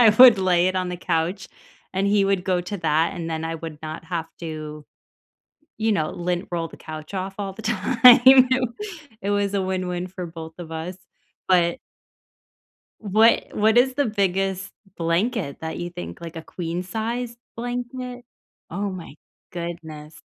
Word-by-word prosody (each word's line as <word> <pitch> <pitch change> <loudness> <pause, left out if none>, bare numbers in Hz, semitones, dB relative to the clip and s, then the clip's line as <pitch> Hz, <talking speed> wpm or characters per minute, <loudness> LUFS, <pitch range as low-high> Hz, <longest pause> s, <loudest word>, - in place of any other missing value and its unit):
I 230 -3 +8
would 250 -5 +10
lay 180 -2 +3
it 185 - -2
on 185 -1 0
the 180 - -4
couch, 175 +2 -1 0.4
and 190 +1 0
he 200 0 +3
would 195 -2 +1
go 185 -2 +1
to 180 +3 -5
that, 160 0 +1
and 165 -1 -4
then 160 0 -2
I 165 0 -3
would 160 -2 -7
not 155 +1 -6
have 165 -2 -3
to, 155 -2 -6 0.9
you 220 0 +2
know, 155 -5 0
lint 175 +2 -2
roll 165 -1 -1
the - - -13
couch 155 +3 -8
off 190 0 -3
all 200 -1 -3
the 220 +4 -10
time. 245 +4 +7 0.7
It 200 - -1
was 205 0 +1
a 195 - +1
win-win 185 -1 -2
for 180 -1 -6
both 160 -1 -9
of 170 -2 -8
us. 165 +3 -5 0.5
But 175 +4 +3 1.2
what 220 +2 +4
what 220 +2 +3
is 255 +1 +5
the 285 - +2
biggest 195 -2 0 0.3
blanket 170 - 0
that 160 0 -5
you 175 0 -4
think, 175 0 -8
like, 170 0 -8
a - - -5
queen-size 220 +9 -4 0.2
blanket? 245 +1 -5 0.5
Oh 200 +4 -2
my 180 -6 -8 0.4
goodness. 160 -3 -7
185 Hz, 165 wpm, -23 LUFS, 165-210 Hz, 1.2 s, would